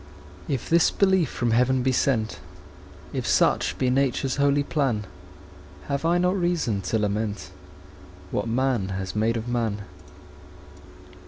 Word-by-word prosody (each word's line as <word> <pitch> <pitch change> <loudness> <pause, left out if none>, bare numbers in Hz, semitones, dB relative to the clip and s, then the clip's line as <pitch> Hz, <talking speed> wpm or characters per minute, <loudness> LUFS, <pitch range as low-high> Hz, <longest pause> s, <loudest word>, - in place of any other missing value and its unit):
If 135 -4 -2
this 170 0 +4
belief 190 -6 +2
from 120 -2 -1
heaven 125 +2 +2
be 130 - +2
sent, 120 -4 0 0.7
If - - -3
such - - +2
be 130 -1 +1
Nature's 135 0 0
holy 140 0 +3
plan, 135 -9 -1 0.8
Have 140 +3 -1
I 170 +1 +3
not 180 +2 +2
reason 175 - 0
to 110 - +1
lament 105 -1 -2 0.8
What 105 - -1
man 120 -3 0
has 95 0 -5
made 110 +2 +1
of 115 +1 -5
man? 115 -4 -1
125 Hz, 135 wpm, -25 LUFS, 110-140 Hz, 0.8 s, this